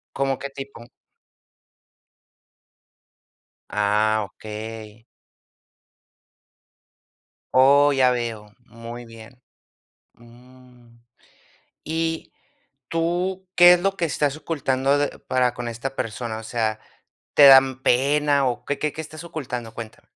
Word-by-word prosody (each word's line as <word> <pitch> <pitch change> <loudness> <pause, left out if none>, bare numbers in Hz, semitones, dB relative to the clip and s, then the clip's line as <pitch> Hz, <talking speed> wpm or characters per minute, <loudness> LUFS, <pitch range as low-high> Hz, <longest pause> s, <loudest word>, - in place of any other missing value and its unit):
¿Como 135 -1 0
qué 140 - -6
tipo? 135 -3 -9 2.9
Ah, 105 +1 +1
okey. 110 +1 -9 2.5
Oh, 140 +2 +6
ya 130 -1 +4
veo. 115 -4 -4
Muy 120 +1 -10
bien. 115 +2 -14 0.7
Mm. 120 0 -20 0.8
Y 165 0 -3 0.6
tú, 175 +3 -2
¿qué 175 0 +9
es 175 - +1
lo 195 0 -1
que 170 - 0
estás 145 -1 -1
ocultando 140 -3 0
de 145 0 -2
para 125 -1 0
con 120 -1 -6
esta 120 +4 -5
persona? 110 -1 -4
O 110 - -8
sea, 110 -1 -2 0.5
¿te 145 - +8
dan 135 -1 +6
pena 140 +2 +2
o 120 - -3
qué, 140 - -3
qué, 150 -1 -2
qué 160 - -5
estás 155 +2 -10
ocultando? 125 -8 -6
Cuéntame 115 -2 -10
130 Hz, 105 wpm, -23 LUFS, 115-145 Hz, 2.9 s, qué